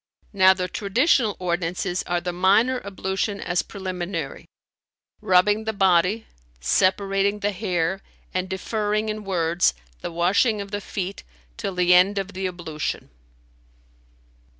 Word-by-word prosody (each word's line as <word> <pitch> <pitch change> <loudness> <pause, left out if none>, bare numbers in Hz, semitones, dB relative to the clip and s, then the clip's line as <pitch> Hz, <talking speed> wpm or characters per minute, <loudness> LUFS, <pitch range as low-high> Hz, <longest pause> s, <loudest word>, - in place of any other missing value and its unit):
Now 190 -1 +6
the 180 -1 -2
traditional 220 - +2
ordinances 175 0 -2
are 175 0 +1
the 180 0 -4
minor 205 +8 +3
ablution 200 +1 -3
as 175 0 0
preliminary; 180 -5 -5 0.8
rubbing 205 +4 +3
the 220 - -1
body; 190 +2 +2 0.3
separating 195 - +1
the 205 +1 +1
hair 185 -2 -1 0.3
and 185 0 -2
deferring 210 +2 -1
in 215 0 -4
words[FN#310] 175 -3 +1 0.3
the - - -4
washing 190 +6 +2
of 200 -1 -6
the 205 0 -3
feet 195 0 -5 0.3
till 185 - -4
the 180 0 +4
end 185 +3 +5
of 195 0 -3
the 190 0 -2
ablution." 170 - -5
190 Hz, 125 wpm, -24 LUFS, 180-205 Hz, 0.8 s, Now